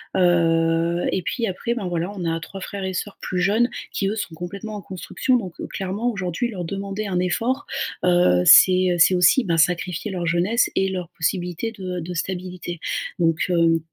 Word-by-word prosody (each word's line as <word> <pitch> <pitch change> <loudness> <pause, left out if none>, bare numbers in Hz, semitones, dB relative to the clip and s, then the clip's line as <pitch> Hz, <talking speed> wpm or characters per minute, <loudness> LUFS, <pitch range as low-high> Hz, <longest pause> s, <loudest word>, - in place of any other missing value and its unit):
Heu 170 -1 +2
et 190 - -1
puis 230 +7 -2
après 220 +5 -2
ben 210 -6 -3
voilà, 175 +2 -2
on 180 -3 -5
a 165 0 -1
3 195 +4 -9
frères 200 0 -6
et 190 0 -3
sœurs 200 +3 -4
plus 180 - -3
jeunes 215 +6 +2 0.2
qui 195 - -1
eux 205 - -1
sont 210 -6 -4
complètement 195 +6 -7
en 205 - -6
construction 190 +7 -1
donc 185 -7 -7
heu, - - -5
clairement 195 +5 -2
aujourd'hui 195 +3 -2
leur 185 -6 -5
demander 200 +3 -4
un 180 -2 -1
effort, 230 +9 -1 0.4
heu, 175 - +4
c'est 185 - +7
c'est 170 +3 +6
aussi 180 +9 +5
ben 170 -5 0
sacrifier 180 +4 +1
leur 180 -2 -3
jeunesse 175 +8 +1
et 195 - +2
leur 180 -3 -4
possibilité 180 +5 -2
de 205 -4 -11
heu, - - -3
de 175 +2 -6
stabilité. 180 -1 -4 0.4
Donc 165 -1 +2
hem, 165 -2 +3
180 Hz, 195 wpm, -22 LUFS, 170-200 Hz, 0.4 s, c'est